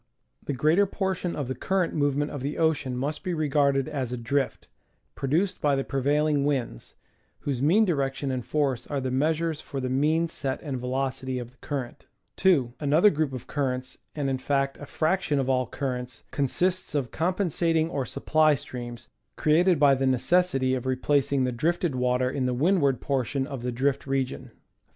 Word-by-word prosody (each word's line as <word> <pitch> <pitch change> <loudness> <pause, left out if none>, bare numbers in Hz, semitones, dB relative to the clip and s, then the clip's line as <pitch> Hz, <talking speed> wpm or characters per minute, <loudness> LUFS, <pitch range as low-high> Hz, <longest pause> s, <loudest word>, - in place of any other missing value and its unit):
The 145 - -3
greater 160 +9 +3
portion 190 -3 -2
of 145 -4 -3
the 130 - -2
current 190 +4 0
movement 145 0 0
of 145 - -5
the 140 +3 -3
ocean 145 -6 +1
must 145 +6 -3
be 180 -2 -2
regarded 140 -3 +2
as 130 -4 -3
a 125 - -3
drift, 135 +3 -1 0.5
produced 165 +8 0
by 145 -2 +3
the 135 - 0
prevailing 145 +2 +1
winds, 135 - -2 0.5
whose 135 -4 -2
mean 185 +10 +4
direction 140 -5 -1
and 130 -2 -2
force 140 -4 -1
are 145 - -2
the 130 -1 -2
measures 155 +3 0
for 140 - -6
the 130 -1 -2
mean 155 +5 +2
set 140 -5 -3
and 140 -5 -3
velocity 130 +1 -2
of 120 -1 -6
the 130 - -29
current. 135 -4 -5 0.3
2. 140 -11 +3
Another 155 +8 +4
group 155 -2 0
of 130 -3 -6
currents, 130 -2 -3 0.2
and 145 -2 -1
in 135 -1 -1
fact 135 0 0
a 145 - -8
fraction 160 -1 0
of 135 -1 +1
all 130 -1 +1
cur 135 -3 -2
rents, 125 -2 -7
consists 175 +6 0
of 135 -5 -1
compensating 165 -2 +1
or 145 -5 -2
supply 155 +5 +2
streams, 120 -2 -7 0.3
created 170 +2 +3
by 145 -2 +6
the 135 0 +1
necessity 135 0 +2
of 130 0 -2
replacing 135 +1 +1
the 125 - 0
drifted 165 +5 0
water 125 0 +1
in 130 0 -1
the 125 - 0
windward 140 -3 +2
portion 135 -1 -1
of 135 -3 -6
the 125 +1 -2
drift 135 +3 0
region. 135 -1 -2
140 Hz, 180 wpm, -26 LUFS, 130-155 Hz, 0.5 s, by